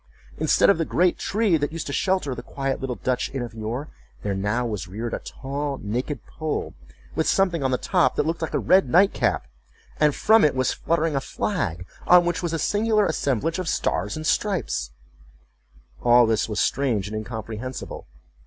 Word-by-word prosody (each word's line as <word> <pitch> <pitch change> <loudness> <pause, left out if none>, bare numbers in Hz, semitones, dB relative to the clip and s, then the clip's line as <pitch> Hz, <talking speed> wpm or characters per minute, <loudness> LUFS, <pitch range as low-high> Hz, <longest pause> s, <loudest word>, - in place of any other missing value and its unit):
Instead - - +4
of 170 - 0
the - - +2
great 175 +2 +1
tree 210 -5 +2
that 145 0 -2
used 165 -1 -5
to 140 - -4
shelter 185 -7 0
the 120 - -6
quiet 135 +1 -3
little 130 -2 -3
Dutch 125 0 -1
inn 130 - -1
of 120 -2 -7
yore, 115 +6 -4 0.4
there 100 - -1
now 105 +5 -1
was 105 -6 -4
reared 110 +5 -5
a - - -2
tall 140 +1 -4
naked 120 +5 -3
pole, 155 -2 -4 0.4
with 160 - 0
something 185 -5 +2
on 135 - +1
the 130 - +1
top 130 - +2
that - - +1
looked 165 +1 -2
like 160 - -2
a - - +2
red 185 -8 +4
night 190 +8 +5
cap, - - 0 0.5
and 150 -2 +3
from 220 0 +5
it 145 -3 +3
was 130 -1 +1
fluttering 165 -2 0
a 135 - +1
flag, 95 - -2 0.2
on 180 -1 +7
which 175 0 -1
was 170 -2 -2
a 165 - -1
singular 210 +4 +2
assemblage 155 - 0
of 180 -3 -2
stars - - -1
and 155 0 -5
stripes—all 120 - -1
this 110 0 +1
was 105 - -2
strange 120 -8 +1
and 105 - -6
incomprehensible. 110 +3 -6
140 Hz, 190 wpm, -24 LUFS, 115-165 Hz, 0.5 s, on